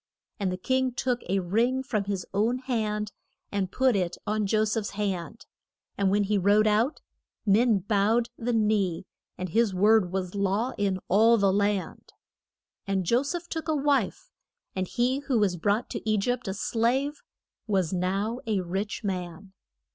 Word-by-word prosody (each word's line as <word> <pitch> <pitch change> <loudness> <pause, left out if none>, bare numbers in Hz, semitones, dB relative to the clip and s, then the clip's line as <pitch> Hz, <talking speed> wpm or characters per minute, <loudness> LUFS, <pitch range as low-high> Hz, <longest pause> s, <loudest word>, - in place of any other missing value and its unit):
And 195 -3 0
the 185 - -3
king 260 +5 0
took 250 -2 -1
a 195 - +2
ring 235 +9 +1
from 215 -6 -1
his 195 -2 -3
own 220 +5 +1
hand 215 -5 -2 0.4
and 195 -2 -1
put 260 -3 +2
it 180 -3 -1
on 210 -1 0
Jo 215 +2 +2
seph's 215 -1 -1
hand, 195 0 -3 0.5
and 200 -1 +1
when 205 +1 +2
he 205 0 +1
rode 205 +3 +4
out, 220 +7 +2 0.4
men 220 +2 +4
bowed 210 +4 +1
the 240 +1 -2
knee, 210 -6 +1 0.3
and 185 0 -4
his 220 +1 +2
word 205 -1 +4
was 185 -1 -3
law 200 +5 0
in 195 -2 +1
all 225 +5 +5
the 200 -2 +3
land. 200 -1 -1 0.7
And 190 -2 0
Jo 235 +8 +3
seph 345 +5 -4
took 325 -1 -5
a 315 - +1
wife, 285 -1 0 0.4
and 185 -1 -1
he 255 +5 0
who 255 - +2
was 200 -4 +2
brought 205 +7 0
to 220 - -4
E 215 - +3
gypt 245 +3 -1
a 190 - -2
slave, 255 - 0 0.5
was 190 -5 +1
now 195 +6 -1
a 210 -4 +1
rich 195 +6 -3
man. 190 0 -5
210 Hz, 170 wpm, -27 LUFS, 195-235 Hz, 0.7 s, all